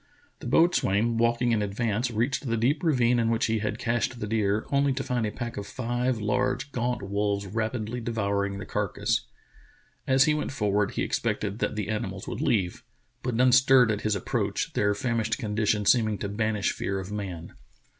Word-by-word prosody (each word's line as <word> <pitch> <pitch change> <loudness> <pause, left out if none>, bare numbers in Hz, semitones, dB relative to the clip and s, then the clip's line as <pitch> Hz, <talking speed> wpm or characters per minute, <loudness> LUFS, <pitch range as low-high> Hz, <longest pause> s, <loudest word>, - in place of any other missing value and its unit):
The - - -7
boatswain 115 - +3
walking 120 +1 +2
in 110 -2 +2
advance 110 +3 -1
reached 120 +4 -1
the 115 -1 0
deep 130 +7 +1
ravine 125 -7 +3
in 115 -1 +2
which 115 0 +1
he 110 0 0
had 105 +1 -2
cached 120 +1 -1
the 105 - -3
deer, 105 -1 0
only 140 0 +3
to 135 +1 -3
find 120 -3 -1
a - - -3
pack 120 +2 -6
of 100 -1 -5
five 120 +1 -1
large, 125 +6 -1
gaunt 125 -3 -2
wolves 100 0 -1
rapidly 110 +3 -3
devouring 100 -3 -1
the 100 - -6
carcass. - - -1 0.8
As 130 0 +5
he 155 - +3
went 150 -1 -2
for 105 -6 0
ward 105 0 +1
he - - -1
expected 100 - -2
that 110 - -1
the 105 - -3
animals 95 -3 -4
would 120 - -4
leave, 110 - 0 0.4
but 125 -2 -2
none 125 +2 +4
stirred 130 -2 +6
at 105 - -2
his 110 -1 0
approach, 100 - -2
their 100 0 +1
famished 115 0 -1
condition 105 -3 0
seeming 110 -2 +3
to 100 - -4
banish 105 -1 0
fear 95 0 -3
of 95 +1 -7
man. 95 -5 -5
115 Hz, 190 wpm, -27 LUFS, 105-125 Hz, 0.8 s, stirred